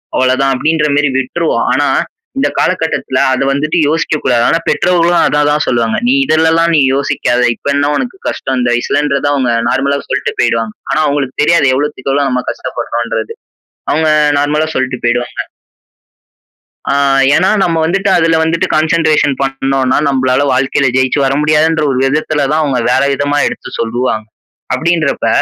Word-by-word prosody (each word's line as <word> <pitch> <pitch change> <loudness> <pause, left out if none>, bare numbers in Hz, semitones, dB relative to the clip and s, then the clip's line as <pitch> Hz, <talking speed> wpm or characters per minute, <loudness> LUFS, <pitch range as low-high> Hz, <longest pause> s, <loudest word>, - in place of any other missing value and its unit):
அவ்வளோதான்." 130 +1 +1
அப்படீன்றமாரி 150 0 +1
விட்டுருவோம். 155 +6 -1
ஆனா, - - +1 0.5
இந்த 270 - +1
காலகட்டத்துல 160 -7 -1
அத 130 +1 0
வந்துட்டு 150 +4 -1
யோசிக்க 160 0 0
கூடாது. 120 -2 +2
ஆனா, 165 - +1
பெற்றோர்களும் 175 -1 +2
அத 150 0 +1
தான் 150 +1 0
சொல்லுவாங்க. 115 -2 0
நீ 125 - +3
இதுலல்லாம் 160 +2 +2
நீ 150 - +4
யோசிக்காத. 125 -3 0
இப்ப - - -10
என்ன 145 0 +1
உனக்கு 255 +9 -4
கஷ்டம்? 130 -1 -3
இந்த 120 - 0
வயசுலன்றத 140 +3 -1
அவுங்க 130 -4 0 0.2
நார்மலா 140 +1 0
சொல்ட்டு - - -2
போயிடுவாங்க. 115 -1 0 0.2
ஆனா, - - +1
அவுங்களுக்கு 140 -2 -2
தெரியாது 160 -2 +3
எவ்வளோத்துக்கு 140 -1 -3
எவ்வளோ 140 0 +1
நம்ம 125 -1 -1
கஷ்டப்படுறோம்ன்றது. 115 -1 -4 0.6
அவுங்க 160 0 +1 0.3
நார்மலா 150 +2 0
சொல்ட்டு 130 -1 -2
போயிடுவாங்க. 120 +1 -1 1.5
அ - - +2 0.4
ஏன்னா 185 +3 +2
நம்ம 165 -3 0
வந்துட்டு, 195 +4 0
அது 165 - +2 0.2
வந்துட்டு 165 +1 0
கான்சென்ட்ரேஷன் 155 -2 +2
பண்ணோன்னா, 135 -1 0
நம்பளால 130 -1 +1
வாழ்க்கையில 135 +1 +1
ஜெயிச்சு 130 +2 +1
வர 135 - +1
முடியாதுன்ற 155 +1 +2
ஒரு 130 - -2
விதத்தில 150 +1 0
தான், 155 +1 +1
அவுங்க 135 -4 -1
வேற 130 - +2
விதமா 145 +1 -1
எடுத்து - - -6
சொல்லுவாங்க. 115 -1 -2 0.5
அப்பிடின்றப்ப, 165 -3 0
140 Hz, 145 wpm, -13 LUFS, 130-155 Hz, 1.5 s, நீ